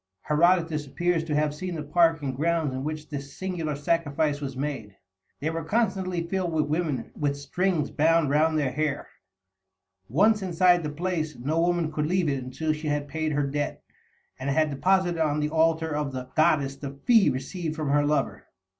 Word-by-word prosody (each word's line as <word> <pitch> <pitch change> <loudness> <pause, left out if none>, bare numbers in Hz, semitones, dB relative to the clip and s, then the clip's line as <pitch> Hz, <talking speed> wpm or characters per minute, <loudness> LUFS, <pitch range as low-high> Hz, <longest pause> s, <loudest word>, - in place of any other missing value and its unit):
Herodotus 165 -1 +2
appears 175 +3 0
to 155 -2 -1
have 150 0 +1
seen 180 +3 -5
the 155 - -4
park 165 0 +3
and 130 -2 -2
grounds 160 -1 0
in 130 +1 -4
which 155 0 -4
this 140 -2 -7
singular 175 -5 -3
sacrifice 145 -1 0
was 135 -2 -5
made. 130 -8 -4 0.4
They 155 +3 -1
were 165 0 -3
constantly 190 -3 0
filled 185 -1 -1
with 155 -1 +2
women 150 -4 -2
with 145 -2 -1
strings 165 +3 -1
bound 160 -1 +3
round 155 +2 +3
their 140 -4 0
hair. 150 +1 -2 1.0
Once 205 - +3
inside 180 -1 +3
the 150 - -3
place, 160 0 -2
no 155 +7 0
woman 170 -2 +1
could 150 -1 -1
leave 180 -2 +1
it 135 -2 -2
until 155 +5 -2
she 155 0 -5
had 145 -1 -1
paid 155 0 -2
her 145 0 +1
debt, 145 +1 -3 0.6
and 130 +2 -3
had 155 +2 +2
deposited 175 +3 +1
on 150 -1 0
the 150 0 0
altar 160 -1 +2
of 145 -2 -2
the 130 0 -6
goddess 145 -3 +3
the 140 -1 -7
fee 225 -8 +6
received 155 +5 -4
from 155 -3 -2
her 145 0 +3
lover. 145 -1 -1
155 Hz, 185 wpm, -26 LUFS, 145-170 Hz, 1.0 s, fee